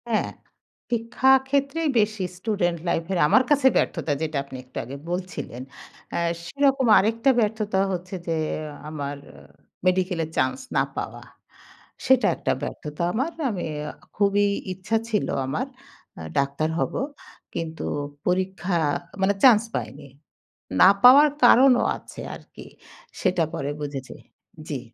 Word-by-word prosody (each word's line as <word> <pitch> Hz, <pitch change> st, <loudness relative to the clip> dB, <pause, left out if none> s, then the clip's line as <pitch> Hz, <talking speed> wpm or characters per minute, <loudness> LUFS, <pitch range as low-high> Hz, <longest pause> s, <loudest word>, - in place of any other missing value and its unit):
হ্যাঁ 220 Hz, -, +1 dB, 0.6 s
শিক্ষাক্ষেত্রেই 265 Hz, +6 st, +2 dB
বেশি 210 Hz, -2 st, 0 dB
স্টুডেন্ট 185 Hz, -4 st, -1 dB
লাইফের 180 Hz, +3 st, -1 dB
আমার 255 Hz, -, +5 dB
কাছে 285 Hz, -2 st, +4 dB
ব্যর্থতা। 150 Hz, -, 0 dB
যেটা 155 Hz, -2 st, -2 dB
আপনি 135 Hz, -1 st, -9 dB
একটু 125 Hz, -, -13 dB
আগে 130 Hz, +4 st, -7 dB
বলছিলেন। 180 Hz, -8 st, -5 dB, 0.5 s
অ্যা -, -, -1 dB, 0.3 s
সেরকম 275 Hz, +4 st, +2 dB
আরেকটা 230 Hz, +5 st, +2 dB
ব্যর্থতা 215 Hz, -3 st, 0 dB
হচ্ছে 185 Hz, +1 st, -4 dB
যে 165 Hz, -, 0 dB, 0.5 s
আমার 145 Hz, -2 st, -5 dB, 0.7 s
মেডিকেলের 180 Hz, -3 st, +1 dB
চান্স 130 Hz, -, +1 dB, 0.2 s
না -, -, +4 dB
পাওয়া -, -, -5 dB, 0.8 s
সেটা 260 Hz, -1 st, +4 dB
একটা -, -, -1 dB
ব্যর্থতা 150 Hz, +2 st, -5 dB
আমার। 265 Hz, +9 st, -1 dB, 0.2 s
আমি 195 Hz, -6 st, -3 dB, 0.2 s
অ্যা 150 Hz, -, -5 dB, 0.3 s
খুবই 205 Hz, 0 st, +3 dB, 0.3 s
ইচ্ছা 190 Hz, +5 st, -1 dB
ছিল 210 Hz, -3 st, 0 dB, 0.2 s
আমার 135 Hz, -, -2 dB, 0.5 s
আ -, -, -7 dB, 0.2 s
ডাক্তার 140 Hz, +3 st, 0 dB
হবো -, -, -1 dB, 0.6 s
কিন্তু 160 Hz, -1 st, -4 dB, 0.4 s
পরীক্ষা 185 Hz, -1 st, 0 dB, 0.4 s
মানে 195 Hz, +1 st, +3 dB
চান্স 230 Hz, -4 st, +7 dB
পাইনি। 145 Hz, +1 st, -5 dB, 0.7 s
না -, -, +9 dB
পাওয়ার 280 Hz, +5 st, +9 dB, 0.2 s
কারণও 250 Hz, +1 st, +6 dB
আছে -, -, -11 dB
আর -, -, -12 dB
কি -, -, -10 dB, 0.6 s
সেটা 180 Hz, -2 st, +2 dB
পরে 140 Hz, -4 st, -3 dB
বুঝেছি 140 Hz, -3 st, -6 dB, 0.5 s
জি। 145 Hz, -4 st, -2 dB
190 Hz, 125 wpm, -24 LUFS, 160-235 Hz, 0.8 s, না